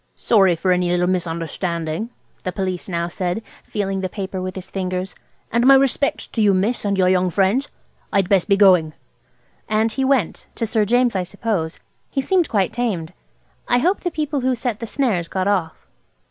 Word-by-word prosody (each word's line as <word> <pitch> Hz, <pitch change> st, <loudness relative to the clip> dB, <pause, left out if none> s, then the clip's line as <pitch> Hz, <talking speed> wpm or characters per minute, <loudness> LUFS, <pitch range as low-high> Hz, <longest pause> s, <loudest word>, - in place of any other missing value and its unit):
"Sorry 195 Hz, -6 st, +3 dB
for 185 Hz, +3 st, 0 dB
any 180 Hz, -1 st, +2 dB
little 175 Hz, 0 st, +2 dB
misunderstanding," 170 Hz, +1 st, -2 dB, 0.3 s
the 185 Hz, -, -3 dB
Police 185 Hz, -1 st, -3 dB
now 170 Hz, -1 st, -1 dB
said, 180 Hz, +4 st, -3 dB, 0.2 s
feeling 195 Hz, -2 st, -2 dB
the 185 Hz, -, -2 dB
paper 190 Hz, -1 st, -5 dB
with 185 Hz, 0 st, -4 dB
his 190 Hz, -1 st, -8 dB
fingers; 185 Hz, 0 st, -3 dB, 0.4 s
"and 235 Hz, +2 st, +3 dB
my 275 Hz, -, +9 dB
respects 275 Hz, +1 st, +1 dB
to 225 Hz, -, -3 dB
you, 200 Hz, -2 st, +4 dB
miss, 210 Hz, +6 st, 0 dB
and 200 Hz, -1 st, 0 dB
your 185 Hz, -1 st, +3 dB
young 185 Hz, 0 st, +3 dB
friends. 200 Hz, -, +1 dB, 0.4 s
I'd 195 Hz, -2 st, +2 dB
best 195 Hz, 0 st, +2 dB
be 200 Hz, -, +4 dB
going." 180 Hz, -6 st, +5 dB, 0.8 s
And 220 Hz, +1 st, +2 dB
he 265 Hz, +4 st, -1 dB
went–to 260 Hz, -3 st, -1 dB
Sir 220 Hz, -1 st, +1 dB
James, 245 Hz, +1 st, +2 dB
I 190 Hz, -, +1 dB
suppose. 185 Hz, -3 st, -3 dB, 0.3 s
He -, -, -2 dB
seemed 350 Hz, +4 st, +1 dB
quite 195 Hz, -5 st, +1 dB
tamed. 200 Hz, -10 st, -2 dB, 0.5 s
I 245 Hz, -, +3 dB
hope 355 Hz, +10 st, +2 dB
the 355 Hz, -, -2 dB
people 300 Hz, -3 st, -2 dB
who 255 Hz, 0 st, +1 dB
set 240 Hz, -3 st, -3 dB
the 230 Hz, -, -5 dB
snares 215 Hz, -11 st, 0 dB
got 190 Hz, +2 st, -2 dB
off. 185 Hz, -5 st, -1 dB
195 Hz, 185 wpm, -21 LUFS, 180-235 Hz, 0.8 s, my